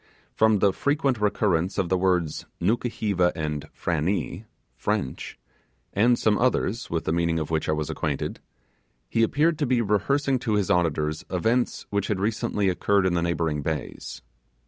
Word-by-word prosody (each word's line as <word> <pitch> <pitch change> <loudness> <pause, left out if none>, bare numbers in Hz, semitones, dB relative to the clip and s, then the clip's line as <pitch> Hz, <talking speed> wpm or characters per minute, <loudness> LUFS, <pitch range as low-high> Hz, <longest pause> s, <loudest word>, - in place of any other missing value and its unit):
From 110 -1 +4
the 100 -1 +3
frequent 140 -5 0
recurrence 95 -3 +1
of 90 -3 0
the 95 - +3
words 90 -4 0
'Nukuheva' 105 -3 +1
and 75 -3 -3
'Frannee' 90 +5 -2 0.3
(French), 65 -2 -3 0.6
and 120 +4 +4
some 105 -1 +2
others 120 -2 0
with 80 -1 -1
the - - -1
meaning 85 -1 +1
of 80 0 -3
which 80 -1 0
I - - +3
was 75 -1 -2
acquainted, 75 -3 -3 0.7
he 115 - 0
appeared 150 +7 +2
to 145 - +1
be 125 -1 +2
rehearsing 130 +6 +1
to 110 -3 0
his 100 -3 +1
auditors 80 -3 +1
events 115 +7 0
which 100 -1 0
had 105 -3 -1
recently 105 -1 0
occurred 95 +1 +2
in 95 - +2
the 85 - +1
neighbouring 80 -3 0
bays. 75 -1 -5
95 Hz, 160 wpm, -25 LUFS, 80-110 Hz, 0.7 s, From